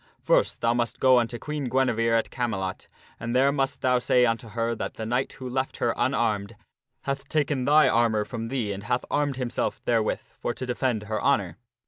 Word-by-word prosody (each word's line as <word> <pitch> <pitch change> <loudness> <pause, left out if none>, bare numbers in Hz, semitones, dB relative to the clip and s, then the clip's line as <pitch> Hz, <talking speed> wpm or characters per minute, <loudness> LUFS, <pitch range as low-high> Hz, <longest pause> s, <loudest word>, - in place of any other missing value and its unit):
First - - +2
thou 115 0 +3
must 120 -1 -1
go 130 -1 +6
unto 120 0 -2
Queen 150 +2 -4
Guinevere 115 -3 +2
at 115 - -2
Camelot, 95 -7 -3 0.3
and 120 +2 -3
there 135 +2 +4
must 135 -1 -1
thou 125 -1 +3
say 125 0 +3
unto 115 0 -1
her 115 +2 -1
that - - -5
the 110 - -5
knight 125 +4 -1
who 130 - -8
left 130 +1 -2
her 120 - +1
unarmed 115 -4 0 0.5
hath 140 0 -4
taken 145 -4 0
thine 150 +2 +5
armor 115 -2 +2
from 115 0 -5
thee 115 -4 -2
and 100 +1 -8
hath 125 +4 0
armed 145 -3 0
himself 125 -2 -2
therewith 115 -3 +1 0.2
for 120 - -2
to 130 - -5
defend 125 -3 -1
her 110 0 -3
honor. 105 -11 +1
120 Hz, 195 wpm, -26 LUFS, 115-130 Hz, 0.5 s, go